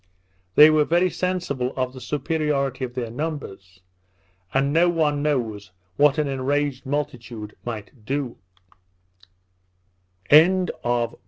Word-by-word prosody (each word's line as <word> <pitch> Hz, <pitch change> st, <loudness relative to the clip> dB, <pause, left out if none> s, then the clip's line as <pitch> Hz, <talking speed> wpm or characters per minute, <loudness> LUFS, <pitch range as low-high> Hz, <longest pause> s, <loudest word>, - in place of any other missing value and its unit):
They 150 Hz, +1 st, +9 dB
were 155 Hz, -1 st, +4 dB
very 175 Hz, +4 st, +2 dB
sensible 170 Hz, -9 st, -2 dB
of 130 Hz, -1 st, -1 dB
the 130 Hz, -, -10 dB
superiority 145 Hz, -2 st, -1 dB
of 125 Hz, -1 st, -5 dB
their 120 Hz, -3 st, -3 dB
numbers; 115 Hz, -, -6 dB, 0.7 s
and 140 Hz, +1 st, +1 dB
no 170 Hz, +2 st, +4 dB
one 150 Hz, -4 st, +1 dB
knows 115 Hz, -9 st, -2 dB, 0.3 s
what 145 Hz, +1 st, +4 dB
an 150 Hz, -1 st, +1 dB
enraged 140 Hz, 0 st, -1 dB
multitude 120 Hz, -6 st, -4 dB
might 110 Hz, 0 st, -7 dB
do. 135 Hz, 0 st, -3 dB
140 Hz, 105 wpm, -23 LUFS, 125-150 Hz, 0.7 s, They